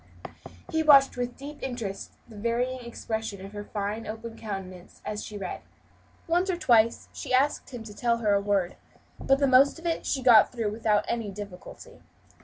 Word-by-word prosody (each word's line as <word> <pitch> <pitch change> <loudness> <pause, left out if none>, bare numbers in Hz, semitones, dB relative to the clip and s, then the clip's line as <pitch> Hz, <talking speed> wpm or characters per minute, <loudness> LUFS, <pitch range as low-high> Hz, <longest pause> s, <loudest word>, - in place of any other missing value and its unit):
He 320 - +1
watched 280 -3 +6
with 245 0 -4
deep 290 +2 -9
interest 230 -7 -5
the 225 - -14
varying 235 +4 -1
expression 220 -4 -5
of 195 - -11
her 205 0 -6
fine 205 +2 -4
open 225 +1 -7
countenance 190 -5 -8
as 210 0 -4
she 210 - -7
read. 190 -3 -5 0.6
Once 350 +3 +1
or 360 - 0
twice 230 -7 +3
she - - -1
asked 280 +3 +1
him 245 -3 -7
to 215 -2 -10
tell 235 +2 +1
her 215 -3 +1
a 200 - +3
word, 200 -3 0 0.4
but 270 - +3
the 280 - +2
most 270 +3 +5
of 330 - -13
it 335 -1 -1
she 265 -2 -1
got 235 -4 +7
through 230 -4 -2
without 215 -1 +1
any 230 -3 -2
difficulty. 200 -2 -10
230 Hz, 185 wpm, -27 LUFS, 205-255 Hz, 0.6 s, got